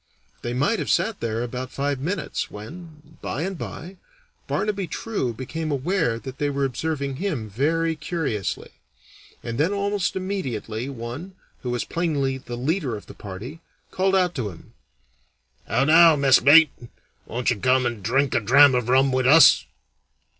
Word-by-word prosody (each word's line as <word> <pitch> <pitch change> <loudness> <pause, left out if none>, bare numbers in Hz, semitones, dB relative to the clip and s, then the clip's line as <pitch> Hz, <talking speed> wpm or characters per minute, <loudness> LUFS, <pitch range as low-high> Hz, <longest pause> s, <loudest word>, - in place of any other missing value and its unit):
They 120 0 -4
might 190 - +1
have - - -3
sat 200 +5 +1
there 115 0 -2
about 125 +1 -5
five 140 0 -2
minutes, 170 +5 -3
when, 155 +7 -12
by 145 - -3
and 190 +1 -3
by, 180 +2 -8 0.5
Barnaby 200 -2 -1
True 200 - -3
became 150 +7 -5
aware 145 -3 0
that 130 +2 -9
they 145 - 0
were 140 -1 0
observing 140 0 -3
him 150 - -3
very 160 +9 0
curiously; 145 - -3 0.7
and 115 +1 -5
then 165 +6 +2
almost 200 -1 -1
immediately 130 - -4
one, 135 +9 -7 0.3
who 125 - -4
was 120 -1 -2
plainly 140 -6 -1
the 120 -2 -7
leader 140 - -1
of 105 - -12
the - - -12
party, 105 - -9 0.3
called 190 +1 +1
out 180 -2 +2
to 120 -9 -3
him: 85 -3 -14 0.9
"How 115 +5 +1
now, 165 +1 +7
messmate! 140 +2 +6 0.6
Won't 120 +2 -1
you 120 - -1
come 130 +3 +2
and 120 -3 -3
drink 135 +7 +1
a - - +3
dram 135 +6 +6
of 125 -1 0
rum 135 +1 +4
with 130 0 +1
us?" 150 +1 +7
140 Hz, 160 wpm, -23 LUFS, 125-165 Hz, 0.9 s, now